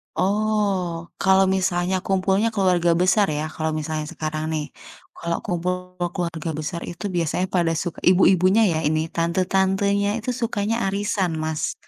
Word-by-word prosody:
Oh, 195 -4 0
kalau 190 0 +4
misalnya 185 -1 +1
kumpulnya 195 +4 +1
keluarga 180 -4 +3
besar 195 +3 +4
ya, 150 +1 -2
kalau 160 0 -3
misalnya 155 0 -3
sekarang 155 0 -3
nih. 150 -1 -1 0.6
Kalau 170 0 -1
kumpul 180 +1 -3 0.2
keluarga 170 -3 -3
besar 170 +3 -4
itu 175 - -8
biasanya 175 +2 0
pada 170 -2 +2
suk 175 -2 -4
ibu-ibunya 185 +2 +4
ya 155 - 0
ini 155 +1 0
tante-tantenya 190 +4 +1
itu 235 +3 -5
sukanya 220 -2 -1
arisan, 195 -2 0
Mas. 155 -1 -2
180 Hz, 135 wpm, -23 LUFS, 165-195 Hz, 0.6 s, kalau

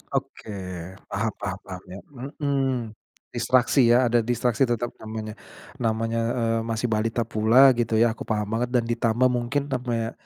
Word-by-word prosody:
Oke. 110 - -4 0.6
Paham 110 +2 -1
paham 100 -1 -3
paham 90 -2 -8
ya 95 - -7 0.4
mmm. 135 -5 0 0.4
Distraksi 130 0 +3
ya, 120 0 +4
ada 120 - +4
distraksi 120 +2 +1
tetap 120 0 -1
namanya, 110 0 -6 0.5
namanya, 115 0 0 0.2
eee, 115 -1 +1
masih 115 +1 -1
balita 115 +2 0
pula 115 +5 +5
gitu 115 -1 0
ya, 115 +1 +4
aku 110 - -8
paham 105 -1 0
banget 120 +2 0
dan 120 - +3
ditambah 120 +2 +1
mungkin 140 +4 -1
sampai 120 -3 -1
115 Hz, 150 wpm, -25 LUFS, 110-125 Hz, 0.6 s, pula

